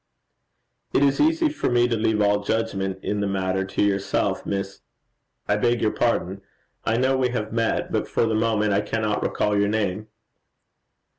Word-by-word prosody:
'It -, -, +4 dB
is 140 Hz, -1 st, +2 dB
easy 320 Hz, +2 st, +3 dB
for 305 Hz, -, -2 dB
me 120 Hz, 0 st, +3 dB
to 120 Hz, -, 0 dB
leave 110 Hz, -1 st, +1 dB
all 105 Hz, 0 st, +2 dB
judgment 100 Hz, -4 st, -1 dB
in 105 Hz, -, -1 dB
the 100 Hz, -, 0 dB
matter 95 Hz, -1 st, -1 dB
to 95 Hz, +1 st, -1 dB
yourself, 100 Hz, -1 st, 0 dB
Miss 100 Hz, 0 st, -4 dB, 0.7 s
I 105 Hz, -, +2 dB
beg 120 Hz, +2 st, +1 dB
your 110 Hz, -, +1 dB
pardon; 100 Hz, -5 st, -1 dB, 0.4 s
I 110 Hz, +1 st, +1 dB
know 130 Hz, +2 st, +2 dB
we 130 Hz, -1 st, +1 dB
have 110 Hz, -3 st, -3 dB
met; 115 Hz, -1 st, 0 dB
but -, -, -1 dB
for -, -, +1 dB
the 110 Hz, -, 0 dB
moment 110 Hz, -1 st, +1 dB
I 100 Hz, -, +2 dB
cannot 110 Hz, -1 st, -1 dB
recall 105 Hz, 0 st, 0 dB
your 100 Hz, 0 st, +2 dB
name.' 105 Hz, -1 st, -1 dB
105 Hz, 175 wpm, -24 LUFS, 100-115 Hz, 0.7 s, It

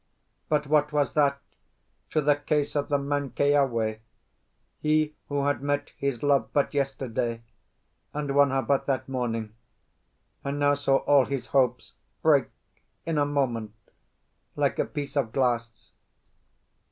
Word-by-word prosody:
But 150 Hz, -1 st, +1 dB
what 150 Hz, +1 st, +2 dB
was 145 Hz, -2 st, +1 dB
that 140 Hz, -2 st, +2 dB, 0.7 s
to 155 Hz, -, +1 dB
the 145 Hz, 0 st, +4 dB
case 145 Hz, 0 st, -1 dB
of 145 Hz, -1 st, -1 dB
the 145 Hz, -, +3 dB
man 140 Hz, 0 st, -2 dB
Keawe, 130 Hz, -7 st, +1 dB, 0.8 s
he 155 Hz, 0 st, +1 dB
who 140 Hz, -1 st, 0 dB
had 145 Hz, -3 st, 0 dB
met 145 Hz, 0 st, -1 dB
his 140 Hz, -3 st, -2 dB
love 140 Hz, -1 st, +2 dB
but 145 Hz, 0 st, +1 dB
yesterday, 130 Hz, -4 st, -2 dB, 0.7 s
and 145 Hz, -2 st, -3 dB
won 140 Hz, 0 st, +5 dB
her 135 Hz, 0 st, 0 dB
but 135 Hz, +4 st, 0 dB
that 135 Hz, -2 st, -1 dB
morning, 115 Hz, -4 st, -3 dB, 0.9 s
and 140 Hz, +1 st, -3 dB
now 145 Hz, 0 st, +3 dB
saw 140 Hz, -1 st, +2 dB
all 140 Hz, -2 st, +5 dB
his 140 Hz, -3 st, -3 dB
hopes 125 Hz, -3 st, +1 dB, 0.3 s
break, -, -, +4 dB, 0.6 s
in 160 Hz, -2 st, 0 dB
a 145 Hz, -, +2 dB
moment, 120 Hz, -7 st, -1 dB, 0.8 s
like -, -, 0 dB
a -, -, +2 dB
piece 145 Hz, -1 st, -6 dB
of 130 Hz, -6 st, 0 dB
glass? 120 Hz, -3 st, -1 dB
140 Hz, 140 wpm, -27 LUFS, 130-145 Hz, 0.9 s, won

